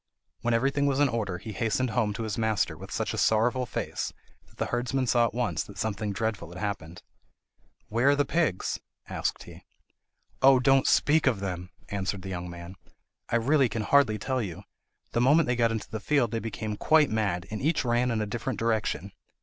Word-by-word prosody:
When 120 0 +1
everything 140 +4 +1
was 140 -1 +1
in 145 - +5
order, 105 -6 -2
he 110 +4 -7
hastened 115 +4 0
home 110 -2 +1
to 115 - -4
his 110 -2 -3
master 110 -3 0
with - - -10
such - - -2
a - - -2
sorrowful 120 +3 +2
face 105 - -3 0.4
that - - -25
the - - -1
herdsman 125 +2 -1
saw 120 -1 +3
at - - -8
once 120 -2 0
that 100 - -12
something 105 -1 -2
dreadful 105 -4 -2
had 85 - -10
happened. 90 -3 -5 0.8
"Where 120 +5 +2
are 145 - +5
the 145 0 +2
pigs?" 145 - 0 0.3
asked - - -2
he. - - -12 0.8
"Oh, 135 -1 +7
don't 135 +1 +4
speak 150 0 +3
of 120 -7 +2
them!" 90 -2 -4 0.2
answered 100 -1 -3
the 95 - -6
young 90 -1 -4
man; 85 +2 -9 0.5
"I - - 0
really 135 +2 +3
can 110 0 -2
hardly 130 -2 +4
tell 130 +5 -1
you. 95 -2 -6 0.5
The 120 - +1
moment 145 +6 +5
they 125 - 0
got 115 -1 +2
into 110 -2 -4
the 110 - -3
field 125 0 +1
they 115 - -1
became 110 -1 -4
quite 155 0 +4
mad, 100 -5 0
and 110 - -4
each 150 -1 +1
ran 120 +1 +2
in 115 -2 0
a - - 0
different 120 +2 -3
direction. 110 -3 -1
115 Hz, 205 wpm, -28 LUFS, 100-130 Hz, 0.8 s, Oh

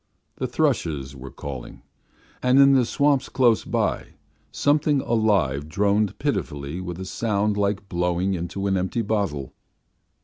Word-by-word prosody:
The 130 - -2
thrushes 85 - -1
were 65 0 -9
calling, 65 -2 -8 0.6
and 125 +1 +3
in 140 0 +7
the 130 -2 +4
swamps 140 +2 +1
close 120 -4 +3
by - - -2 0.4
something 145 0 +2
alive 95 - +1
droned 100 +3 +1
pitifully 70 +4 -3
with 90 -1 -6
a 95 - -5
sound 105 0 0
like 100 -1 -1
blowing 90 +1 0
into 90 +3 -4
an 95 -1 +1
empty 95 +5 -1
bottle. 100 -11 -2
100 Hz, 135 wpm, -24 LUFS, 85-120 Hz, 0.6 s, in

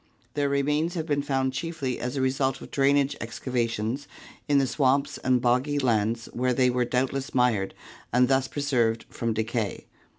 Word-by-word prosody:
Their 145 -1 0
remains 150 +5 +1
have 160 -2 -2
been 145 -3 0
found 135 -2 0
chiefly 145 -3 -3
as 125 +3 -3
a - - 0
result 130 0 +1
of - - -11
drainage 140 0 +3
excavations 115 +1 -2 0.4
in 145 -1 +3
the 135 - +4
swamps 140 +1 +1
and 130 -1 +2
boggy 125 +4 +1
lands 115 -3 +1
where 125 0 0
they 125 -1 +3
were 125 0 +1
doubtless 130 +2 -1
mired 120 -6 +2 0.4
and 125 +1 +4
thus 135 0 +2
preserved 120 -6 0
from 115 -1 -2
decay. 110 -1 -2
130 Hz, 165 wpm, -26 LUFS, 120-140 Hz, 0.4 s, the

